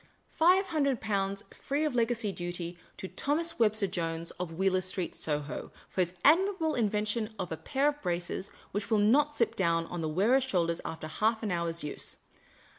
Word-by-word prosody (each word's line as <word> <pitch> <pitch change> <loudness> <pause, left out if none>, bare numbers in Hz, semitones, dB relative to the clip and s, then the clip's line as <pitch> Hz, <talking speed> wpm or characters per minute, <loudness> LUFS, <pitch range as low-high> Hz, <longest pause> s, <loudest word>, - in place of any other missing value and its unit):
Five 365 +4 +5
Hi 315 - -1
ndred 275 -4 +2
Pounds, 200 -1 -1
free 290 +3 -1
of 300 - 0
legacy 230 -3 +1
duty, 175 -1 -5 0.2
to 190 - -5
Thomas 330 - -1
Webster 215 -2 +3
Jones, 165 -2 -3
of 180 -2 -3
Wheeler 185 +2 +2
Street, 185 -1 -2
Soho, 150 -1 -3 0.2
for 185 - 0
his 180 0 -1
admirable 335 0 +4
invention 215 0 0
of 185 -3 -4
a 160 - -2
pair 270 - 0
of 290 0 -6
braces 175 +2 -2 0.2
which 205 0 -3
will 220 - +4
not 280 +8 +4
slip 230 - +1
down 170 -3 +2
on 175 0 -5
the 160 - -1
wearer's 220 - +3
shoulders 170 -9 0
after 160 -1 -5
half 220 +8 0
an 210 - -1
hour's 170 -1 -1
use. 150 - -3
200 Hz, 185 wpm, -30 LUFS, 175-260 Hz, 0.2 s, Five